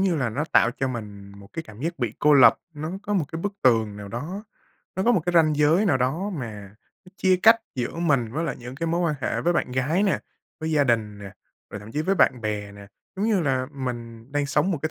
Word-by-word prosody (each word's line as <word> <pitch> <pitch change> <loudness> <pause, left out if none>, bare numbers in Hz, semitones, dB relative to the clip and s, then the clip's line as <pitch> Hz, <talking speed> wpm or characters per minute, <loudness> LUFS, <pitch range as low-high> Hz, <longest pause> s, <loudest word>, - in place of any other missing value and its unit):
như 190 -3 +2
là 130 -6 -1
nó 140 +7 -2
tạo 115 - +5
cho 135 +1 -2
mình 100 -5 -7
một 100 -1 -14
cái 165 - -4
cảm 110 -8 -14
giác 170 +4 -3
bị 120 -4 -1
cô 150 0 +5
lập. 135 -3 +7 0.2
Nó 155 +2 -5
có 205 - -3
một 180 -6 +1
cái 160 - -4
bức 205 +3 -2
tường 110 -5 +3
nào 100 -1 -8
đó, 160 - -6 0.5
nó 190 - 0
có 240 - +4
một 200 - +3
cái 175 - +1
ranh 160 -3 +4
giới 155 +7 +4
nào 175 - +3
đó 145 +11 -1
mà 105 - -7 0.3
nó 180 - -16
chia 185 -2 +3
cách 225 +1 +8 0.2
giữa 125 -2 -3
mình 140 -9 +1
với 160 +5 -2
lại 145 -6 -3
những 125 +1 -8
cái 165 +5 -3
mối 170 +1 0
quan 165 -3 +1
hệ - - -1
với 175 - +2
bạn 170 -7 -1
gái 140 +9 +1
nè, 200 -3 +2 0.4
với 160 0 -2
gia 150 -2 +3
đình 110 -5 0
nè, 100 -1 -9 0.4
rồi 100 - -7
thậm 105 +2 -11
chí 150 - -1
với 190 +5 +1
bạn 130 -8 +3
bè 105 -2 -3
nè. 100 0 -12 0.3
Giống 200 +3 0
như 215 -4 +2
là 130 -4 0
mình 120 -2 -6
đang 145 -1 0
sống 150 +6 +1
một 170 - -1
cái 160 - -1
140 Hz, 260 wpm, -24 LUFS, 115-170 Hz, 0.5 s, cách